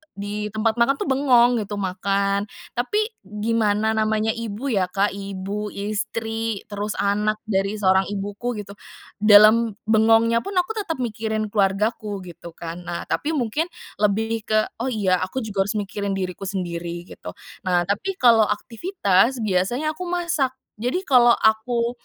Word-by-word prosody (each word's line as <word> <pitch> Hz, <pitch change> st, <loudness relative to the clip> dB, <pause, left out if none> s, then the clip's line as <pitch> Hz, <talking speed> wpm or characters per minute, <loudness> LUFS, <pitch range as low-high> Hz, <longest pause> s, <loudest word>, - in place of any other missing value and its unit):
di 205 Hz, +1 st, -4 dB
tempat 220 Hz, +2 st, -1 dB
makan 235 Hz, +4 st, +4 dB
tuh 275 Hz, -, -3 dB
bengong 250 Hz, -3 st, +4 dB
gitu, 205 Hz, -1 st, -4 dB
makan. 200 Hz, +1 st, 0 dB, 0.2 s
Tapi, 250 Hz, -, -1 dB, 0.2 s
gimana 210 Hz, +1 st, 0 dB
namanya 220 Hz, 0 st, +1 dB
ibu 230 Hz, +4 st, -4 dB
ya, 195 Hz, -5 st, +1 dB
Kak, 195 Hz, +3 st, 0 dB
ibu, 200 Hz, +1 st, -5 dB
istri, 220 Hz, +1 st, -3 dB
terus 205 Hz, +1 st, -3 dB
anak 210 Hz, +1 st, +1 dB
dari 195 Hz, -1 st, 0 dB
seorang 190 Hz, -2 st, +3 dB
ibuku, 205 Hz, +4 st, -4 dB
gitu. 200 Hz, -, -13 dB, 0.5 s
Dalam 215 Hz, +1 st, +6 dB
bengongnya 225 Hz, +1 st, +4 dB
pun, 395 Hz, +8 st, -7 dB
aku 360 Hz, +3 st, +1 dB
tetap 365 Hz, -, -3 dB
mikirin 220 Hz, -1 st, -3 dB
keluargaku, 205 Hz, 0 st, 0 dB
gitu 170 Hz, -1 st, -11 dB
kan. 170 Hz, +1 st, -7 dB
Nah, 175 Hz, -1 st, -4 dB
tapi 315 Hz, +2 st, 0 dB
mungkin 290 Hz, +5 st, -1 dB, 0.3 s
lebih 220 Hz, +2 st, 0 dB
ke 215 Hz, 0 st, +3 dB, 0.2 s
"Oh, 245 Hz, -, -1 dB
iya 200 Hz, -7 st, +1 dB
aku 205 Hz, +7 st, -3 dB
juga 200 Hz, -2 st, -1 dB
harus 205 Hz, -, -2 dB
mikirin 200 Hz, -1 st, -2 dB
diriku 190 Hz, 0 st, -4 dB
sendiri," 175 Hz, -2 st, -4 dB
gitu. -, -, -10 dB, 0.3 s
Nah, 175 Hz, -1 st, +3 dB
tapi 355 Hz, -, -2 dB
kalau 230 Hz, -, +5 dB
aktivitas, 230 Hz, -, +1 dB
biasanya 215 Hz, +10 st, 0 dB
aku 360 Hz, +3 st, -6 dB
masak. 335 Hz, -7 st, 0 dB, 0.2 s
Jadi, 255 Hz, +11 st, -1 dB
kalau 245 Hz, -6 st, +5 dB
aku 235 Hz, +2 st, +1 dB
215 Hz, 145 wpm, -23 LUFS, 200-235 Hz, 0.5 s, Dalam